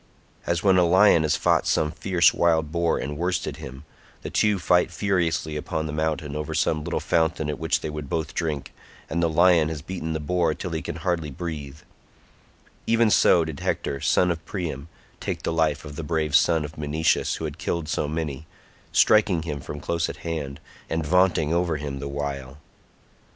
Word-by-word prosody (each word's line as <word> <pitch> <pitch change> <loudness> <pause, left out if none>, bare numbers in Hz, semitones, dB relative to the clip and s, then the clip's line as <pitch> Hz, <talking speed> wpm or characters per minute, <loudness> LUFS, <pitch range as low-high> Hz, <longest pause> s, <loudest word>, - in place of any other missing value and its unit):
As 85 -1 0
when 95 -2 +5
a - - +5
lion 95 0 +5
has 80 -1 +2
fought - - +2
some 75 -1 +1
fierce 90 0 +3
wild 80 -3 +2
boar 85 0 +1
and 75 +2 -4
worsted 90 +1 -1
him—the 65 +3 -11
two 105 -2 +2
fight 90 0 +3
furiously 85 -5 -1
upon 80 +1 -3
the 75 - -4
mountains 75 -2 -2
over 75 -1 -3
some 75 -1 +1
little - - -2
fountain 80 -2 0
at 75 - -6
which 80 -2 0
they - - -4
would 75 -2 -6
both 80 -1 -2
drink, 80 -5 -3 0.4
and 85 +2 0
the 85 - +2
lion 85 -1 +4
has 80 -3 -5
beaten 85 -4 -4
the 80 - -2
boar 85 +1 0
till 90 +1 -5
he 80 -1 -2
can 85 - -5
hardly 85 -2 -2
breathe—even 80 - -4
so 85 -4 +5
did 80 -3 -6
Hector 70 - -2
son 90 -1 +3
of 80 -1 -4
Priam 85 -6 -5 0.3
take - - -4
the - - -1
life 80 -2 0
of 75 -1 -8
the 80 - -5
brave 75 -1 0
son 80 -1 +4
of 75 +1 -10
Menoetius 75 +2 +1
who - - -5
had - - -6
killed 85 -2 -2
so 75 - -1
many, 80 -1 -4 0.4
striking 100 -6 +4
him 75 -3 -4
from 75 - -7
close 85 +3 -1
at - - -7
hand, 75 -5 -4 0.3
and 80 -1 -1
vaunting 90 -2 +3
over 85 -2 +1
him 70 -2 -5
the 70 - -5
while. 70 -1 -5
80 Hz, 190 wpm, -24 LUFS, 75-85 Hz, 0.4 s, when